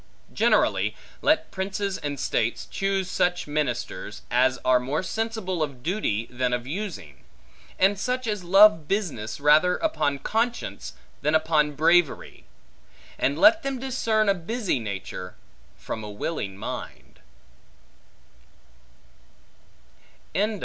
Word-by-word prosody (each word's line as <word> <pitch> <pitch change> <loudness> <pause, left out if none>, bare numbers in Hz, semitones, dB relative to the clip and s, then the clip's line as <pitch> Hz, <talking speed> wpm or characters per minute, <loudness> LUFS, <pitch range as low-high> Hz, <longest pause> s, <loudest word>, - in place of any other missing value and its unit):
Generally, - - +2 0.3
let 310 - +2
princes 195 +1 -3
and 145 -2 -4
states 115 -1 -1
choose 195 -1 -1
such 180 0 0
ministers, 120 -8 -3
as 130 +1 +3
are 130 -1 +5
more 135 +8 -2
sensible 220 -3 -3
of 140 -5 -3
duty 160 - -1
than 125 0 -1
of 120 0 -2
using; 155 - -6 0.5
and 195 +1 +3
such 250 +4 -1
as 210 -4 -2
love 185 -3 +6
business 155 - -2
rather 155 +5 +4
upon 150 - 0
conscience, 230 - -2 0.3
than 150 +2 +2
upon 155 -2 +2
bravery, 160 +1 +2 0.7
and 140 +2 +1
let 320 - +6
them 275 -3 -3
discern 230 -4 0
a 200 - +5
busy 195 - -2
nature, 100 -4 -6 0.4
from 110 - -6
a 105 - -6
willing 105 -2 -4
mind. - - -7
165 Hz, 115 wpm, -25 LUFS, 130-205 Hz, 0.7 s, love